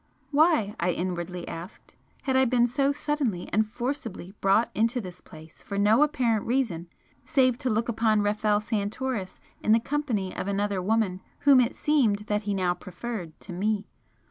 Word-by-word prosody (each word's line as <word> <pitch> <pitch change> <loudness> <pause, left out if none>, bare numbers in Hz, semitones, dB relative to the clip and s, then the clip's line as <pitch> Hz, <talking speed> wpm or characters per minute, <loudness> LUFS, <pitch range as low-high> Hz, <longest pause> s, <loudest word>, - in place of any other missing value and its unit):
Why, 295 - +3
I 175 +1 +1
inwardly 175 0 -4
asked, 170 +3 -9 0.3
had 265 -1 0
I 260 0 +5
been 240 -1 +3
so 275 +3 +1
suddenly 285 -10 -2
and 215 +2 +3
forcibly 240 -6 -5
brought 195 +4 +3
into 230 +3 +1
this 180 -5 -8
place 160 -1 -14
for 200 - -5
no 210 +6 +4
apparent 250 -8 +1
reason 225 -10 0 0.4
save 255 -3 +2
to 260 -3 -1
look 220 +1 0
upon 220 -2 +2
Rafel 210 0 +1
Santoris 215 -1 -3 0.2
in 215 - +3
the 225 - +5
company 235 -8 -2
of - - -4
another 200 -1 0
woman 195 -2 0 0.2
whom 280 -3 +7
it 240 +1 0
seemed 235 -9 +2
that 210 -1 0
he 200 - +1
now 180 -2 +1
preferred 180 -2 -7
to - - -8
me? 205 +3 -1
215 Hz, 170 wpm, -27 LUFS, 190-255 Hz, 0.4 s, whom